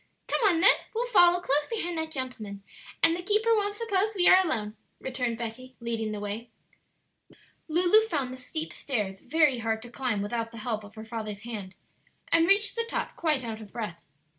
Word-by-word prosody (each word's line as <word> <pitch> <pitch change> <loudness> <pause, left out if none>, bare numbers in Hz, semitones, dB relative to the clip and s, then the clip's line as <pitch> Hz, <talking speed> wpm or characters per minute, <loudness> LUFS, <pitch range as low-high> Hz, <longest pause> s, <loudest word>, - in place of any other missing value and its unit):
"Come - - +1
on 335 -3 +1
then; 390 - +8 0.2
we'll 475 +2 0
follow 355 -7 +5
close 290 -3 +1
behind 350 -7 -3
that 320 0 -3
gentleman, 220 -8 -6 0.4
and 330 - +5
the 355 - -5
keeper 430 +5 +2
won't 410 -1 0
suppose 425 -1 0
we 355 -2 +3
are 375 +1 +7
alone," 215 - -2 0.2
returned 250 -3 -3
Betty, 245 +3 -7
leading 230 -2 -3
the 210 - -4
way. 210 +3 -5 1.2
Lulu 355 +6 +5
found 275 - -2
the - - -8
steep 310 +5 -4
stairs 205 -8 -3
very 295 -1 +2
hard 225 -1 -1
to 240 - -11
climb 240 -6 -1
without 230 +2 -3
the 230 - -11
help 220 -1 -3
of 205 +2 -14
her 220 0 -9
father's 220 -2 -6
hand, 205 -5 -6 0.6
and 330 0 +5
reached 405 +1 +5
the 465 0 -1
top - - -3
quite 300 -6 +1
out 225 -1 -5
of 210 - -12
breath. 210 -8 -6
255 Hz, 190 wpm, -28 LUFS, 220-350 Hz, 1.2 s, then